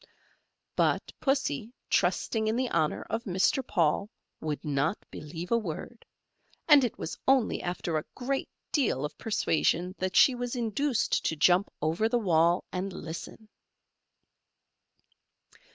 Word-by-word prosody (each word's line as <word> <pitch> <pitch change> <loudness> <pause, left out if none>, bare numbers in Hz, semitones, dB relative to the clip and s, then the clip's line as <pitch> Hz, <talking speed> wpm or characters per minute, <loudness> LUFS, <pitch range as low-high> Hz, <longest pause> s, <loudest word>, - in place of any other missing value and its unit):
But - - +1
Pussy, 255 - 0 0.2
trusting 215 +4 +1
in 220 - +1
the 255 0 -1
honour 155 - +1
of 230 +2 -3
Mr. 190 +7 +2
Paul, 175 +1 +1 0.3
would 155 -1 -4
not 145 +6 0
believe 165 +5 -7
a 235 - +4
word, 220 +4 -7 0.6
and 295 -4 +8
it 240 - -1
was 160 - -5
only 265 -4 +3
after 175 -2 -2
a - - -9
great 270 +1 -2 0.2
deal 220 - +1
of 150 0 -6
persuasion 180 -4 +1
that 185 0 -2
she 265 - +7
was 245 0 -3
induced 240 +2 0
to 160 - +1
jump 180 +5 +4
over 170 +8 +1
the 245 - +2
wall 170 -4 +3
and 190 +2 -3
listen. 170 +6 -8
195 Hz, 135 wpm, -29 LUFS, 165-240 Hz, 0.6 s, and